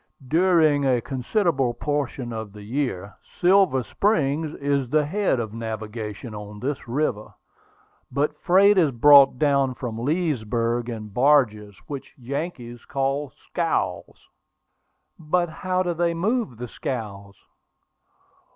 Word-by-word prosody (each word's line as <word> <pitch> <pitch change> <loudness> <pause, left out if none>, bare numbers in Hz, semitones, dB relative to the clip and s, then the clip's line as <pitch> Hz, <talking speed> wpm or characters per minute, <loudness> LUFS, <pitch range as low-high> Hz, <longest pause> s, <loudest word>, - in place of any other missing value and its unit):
During 160 -2 +3
a 130 -3 +2
considerable 135 - 0
portion 140 -4 -3
of 110 -3 -6
the 105 -1 -11
year, 105 -5 -3 0.3
Silver 180 -8 +4
Springs 155 - 0
is 140 -3 -1
the 150 +2 +2
head 190 -4 0
of 110 -2 -4
navigation 110 0 -6
on 105 0 -8
this 135 +1 -4
river; 120 -4 -2 0.8
but 145 +3 0
freight 195 +2 +5
is 160 -4 +4
brought 140 +1 +6
down 140 -2 +2
from 115 -2 -5
Leesburg 120 -5 -1
in 110 -2 -6
barges, 105 -5 +2
which 140 -2 -8
Yankees 125 -2 -6
call 135 +1 -2
scows." 135 - -3 0.9
"But 175 +2 0
how 185 +3 -1
do 175 -1 -1
they 170 0 0
move 205 - -1
the 125 +1 -6
scows?" 100 -6 -6
135 Hz, 120 wpm, -24 LUFS, 115-155 Hz, 0.9 s, brought